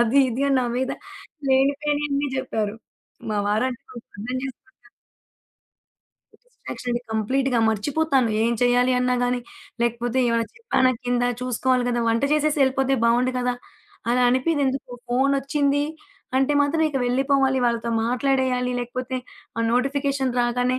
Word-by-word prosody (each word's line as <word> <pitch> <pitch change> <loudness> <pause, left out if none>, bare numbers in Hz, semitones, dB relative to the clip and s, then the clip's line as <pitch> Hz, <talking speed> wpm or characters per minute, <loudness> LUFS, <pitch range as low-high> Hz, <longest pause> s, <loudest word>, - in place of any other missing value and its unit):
అది 240 +4 +4
ఇది" 245 +4 -2
అని 270 - +3
నా 245 - 0
మీద 260 +1 -1 0.6
లేనిపోనియన్ని 285 +1 +1
చెప్పారు. 220 -5 -2 0.5
మా 210 - 0
వారంటే 245 +4 0
కొంచెం 240 -2 -12
అర్దంచేసుకుంటారు. 255 - -7 1.5
డిస్ట్రాక్షన్‌ - - -8
అండి. 240 - -1
కంప్లీట్‌గా 255 +4 +1
మర్చిపోతాను. 265 +3 +1
ఏం 235 - +2
చేయాలి 245 +1 +3
అన్నా 250 0 +1
గాని, 245 0 0 0.4
లేకపోతే 235 +1 0
ఏమైనా 230 -1 +1
చెప్పాన 455 - +2
కిందా 245 0 +1
చూసుకోవాలి 255 0 +1
కదా! 240 -1 0
వంట 230 +2 +1
చేసేసి 305 0 +2
వెళ్ళిపోతే 270 0 +2
బాగుండు 245 +2 +3
కదా! 250 0 0 0.6
అలా 250 +1 +3
అనిపియదెందుకు, 265 -1 0 0.2
ఫోనొచ్చింది 275 +2 +1 0.5
అంటే 270 +2 +2
మాత్రం 290 +3 +2
ఇక 280 - -3
వెళ్ళిపోవాలి 270 +1 +2
వాళ్ళతో 235 -1 -1 0.2
మాట్లాడేయాలి. 250 0 +1
లేకపోతే 250 +1 -4 0.4
ఆ - - +1
నోటిఫికేషన్ 275 +1 0
రాగానే 245 +1 +1
255 Hz, 125 wpm, -23 LUFS, 245-275 Hz, 1.5 s, అది